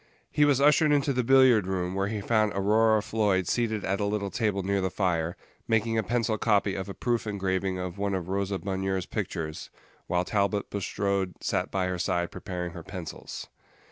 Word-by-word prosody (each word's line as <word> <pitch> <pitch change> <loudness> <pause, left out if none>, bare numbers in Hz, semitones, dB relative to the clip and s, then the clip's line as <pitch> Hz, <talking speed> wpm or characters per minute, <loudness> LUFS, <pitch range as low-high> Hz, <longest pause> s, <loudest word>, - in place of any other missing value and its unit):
He 150 - +4
was 145 -2 +3
ushered 150 +2 +5
into 140 -1 +2
the 125 0 +1
billiard 130 -5 +5
room, 90 -1 -1
where 95 +1 0
he 105 0 -3
found 110 0 +2
Aurora 110 +2 +3
Floyd 100 -6 +1
seated 110 -4 0
at 95 +1 0
a 100 - 0
little 100 -1 -1
table 105 -4 0
near 100 +1 0
the 95 - 0
fire, 85 -3 -1 0.3
making 115 0 +1
a 110 - +3
pencil 110 0 0
copy 105 -3 +2
of 95 0 -4
a 100 - -6
proof 120 -2 -1
engraving 95 -2 -1
of 90 +1 -5
one 100 -1 0
of 90 -2 -4
Rosa 100 +1 -1
Bonheur's 95 -1 -2
pictures, 90 -8 -4 0.4
while 90 +1 +1
Talbot 100 0 0
Bulstrode 100 -2 -1
sat - - -1
by 95 -1 0
her 90 -1 -2
side 85 0 0
preparing 90 -2 -5
her - - -8
pencils. - - -7
100 Hz, 190 wpm, -27 LUFS, 95-110 Hz, 0.4 s, ushered